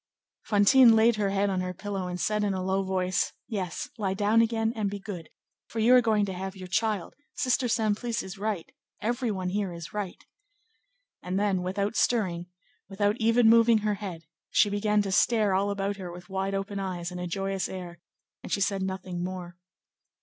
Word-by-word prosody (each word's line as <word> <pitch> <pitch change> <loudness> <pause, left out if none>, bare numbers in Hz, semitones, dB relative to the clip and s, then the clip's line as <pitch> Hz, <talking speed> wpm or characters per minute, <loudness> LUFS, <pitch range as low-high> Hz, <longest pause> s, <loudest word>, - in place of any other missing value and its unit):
Fantine 225 +3 +6
laid 225 0 +4
her 205 -2 +1
head 200 0 +1
on 185 -1 0
her 180 0 -4
pillow 195 -1 -4
and 180 0 -4
said 210 +2 0
in 200 -2 0
a 185 - -3
low 190 +1 +1
voice: 185 -1 0
"Yes, 190 -6 -3
lie 195 -2 0
down 210 +3 +3
again; 225 0 +1
be 200 +1 -3
good, 190 -5 -8 0.4
for - - -9
you 225 +3 +5
are 250 - +8
going 215 -3 +2
to 190 - -4
have 190 +1 -5
your 185 -1 -8
child; 210 -1 -1 0.2
Sister 255 0 +1
Simplice 225 +1 0
is 190 +1 -8
right; 205 -5 -3 0.3
every 240 +2 -1
one 185 -3 -2
here 200 0 -1
is 170 -2 -8
right." 205 -4 -5 1.0
And 185 +2 -2
then, 200 -3 +1
without 200 +4 -2
stirring, 180 -7 +1 0.4
without 205 +1 +1
even 230 +1 +4
moving 230 0 +6
her 210 - +2
head, 190 -5 -6 0.3
she 205 - +3
began 210 0 +2
to 195 - -3
stare 215 0 +3
all 195 +2 +1
about 200 0 -2
her 180 -3 -6
with 175 +3 -11
wide 195 +1 -2
open 195 +1 -3
eyes 180 -2 -4
and 180 - -6
a 180 - -3
joyous 195 +1 -2
air, 175 -2 -7 0.4
and - - -9
she - - +1
said 200 0 0
nothing 190 -2 -4
more. 180 -1 -6
195 Hz, 195 wpm, -28 LUFS, 185-215 Hz, 1.0 s, are